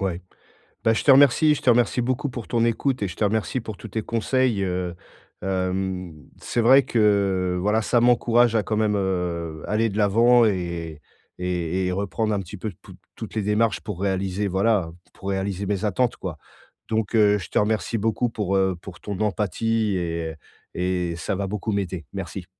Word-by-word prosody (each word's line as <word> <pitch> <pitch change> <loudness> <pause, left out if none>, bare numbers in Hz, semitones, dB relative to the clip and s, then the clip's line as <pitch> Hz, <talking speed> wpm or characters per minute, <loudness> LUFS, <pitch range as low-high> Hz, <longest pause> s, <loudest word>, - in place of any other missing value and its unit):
Ouais. 95 -3 -2 0.6
Bah, 115 - +4
je - - -1
te 140 - +6
remercie 145 +3 +6
je - - -6
te - - +2
remercie 120 +1 +3
beaucoup 130 +4 -1
pour 120 -3 -7
ton 115 -2 +1
écoute 125 +2 0
et - - 0
je 90 - -8
te - - -2
remercie 110 +4 0
pour 110 -3 -7
tous 110 - -9
tes 110 +3 -2
conseils, 115 -1 0
heu, 90 -2 -2 0.5
hem, 95 -1 -2 0.3
c'est 120 - -2
vrai 130 +4 +6
que, 100 -5 +2
voilà, 105 +3 +2
ça 120 +2 +2
m'encourage 120 -1 +4
à 110 - +2
quand 110 - -2
même, 105 -1 +2
heu, 85 -4 -2
aller 110 +2 +1
de 100 - -5
l'avant 115 +4 +5
et 85 -6 -2 0.4
et 90 0 -1
et - - 0
reprendre 100 +3 -1
un 100 - 0
petit 95 +3 -9
peu 105 +2 -4
tou - - -13 0.2
toutes - - -8
les 110 - +1
démarches 105 +1 +1
pour 100 -4 -6
réaliser, 95 +1 -1
voilà, 95 -1 +1
heu, - - -12 0.2
pour 95 - -7
réaliser 95 0 -2
mes 100 +1 -1
attentes, 120 +5 0
quoi. 85 -5 -6 0.5
Donc 110 0 -1
heu, 105 -1 +5
je 95 - -8
te - - -2
remercie 110 +2 0
beaucoup 115 +3 0
pour, 100 -4 -1
heu, 95 -1 +2
pour 90 -2 -10
ton 100 -2 -5
empathie 105 +1 0
et 85 -2 -3 0.4
et 90 -1 -1
ça 95 +4 -3
va 100 0 -2
beaucoup 105 +2 -3
m'aider. 95 -5 -3
Merci. 95 - -6
100 Hz, 195 wpm, -24 LUFS, 95-115 Hz, 0.6 s, te